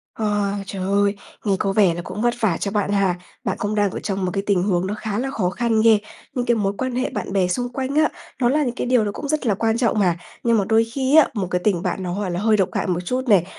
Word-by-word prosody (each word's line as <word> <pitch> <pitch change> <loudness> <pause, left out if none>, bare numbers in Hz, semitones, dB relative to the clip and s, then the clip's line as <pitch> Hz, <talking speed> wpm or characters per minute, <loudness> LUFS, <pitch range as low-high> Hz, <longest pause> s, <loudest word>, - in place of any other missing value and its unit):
Ờ, 205 -2 0
trời 195 0 -6
ơi! 200 +1 +2 0.3
Nghe 200 -2 +2
có 195 - 0
vẻ 195 -4 +4
là 175 - -5
cũng 185 +4 -6
vất 240 0 +2
vả 195 -7 +1
cho 200 - -2
bạn 205 -1 0
ha. 195 -3 +2 0.3
Bạn - - -2
cũng 205 +1 -1
đang 205 -2 +2
ở - - -5
trong 195 -2 -2
một 180 - -1
cái 195 - -1
tình 190 -3 +2
huống 185 -2 +1
nó 200 - -2
khá 215 0 -2
là 270 +2 -2
khó 200 -10 0
khăn 225 +2 +1
ghê. 225 -1 +6 0.4
Những 250 -3 -1
cái 235 - +3
mối 200 -2 0
quan 255 -1 -2
hệ 255 +1 0
bạn - - -5
bè 190 -2 +2
xung 245 +7 -1
quanh 270 +1 -3
á, 310 0 +4 0.3
nó 240 - +4
là 295 +3 +2
những 245 -3 -2
cái 250 - -3
điều 245 -3 +3
nó 205 - -1
cũng 285 - -6
rất 305 -1 -1
là 215 - +3
quan 225 +3 +1
trọng 235 -3 +1
mà. 180 -4 +2 0.3
Nhưng 235 -1 +3
mà 205 - +2
đôi 225 0 +5
khi 260 +5 0
á, 315 - +7
một 200 -5 -2
cái 180 - 0
tình 190 -5 +2
bạn 185 0 -2
nó 180 - -3
hoàn 195 -2 -2
nó 175 - -2
hơi 215 +1 +3
độc 190 -3 +2
hại - - -1
một 175 -2 0
chút 255 +5 -2
này, 195 -6 +5
210 Hz, 300 wpm, -22 LUFS, 195-240 Hz, 0.4 s, á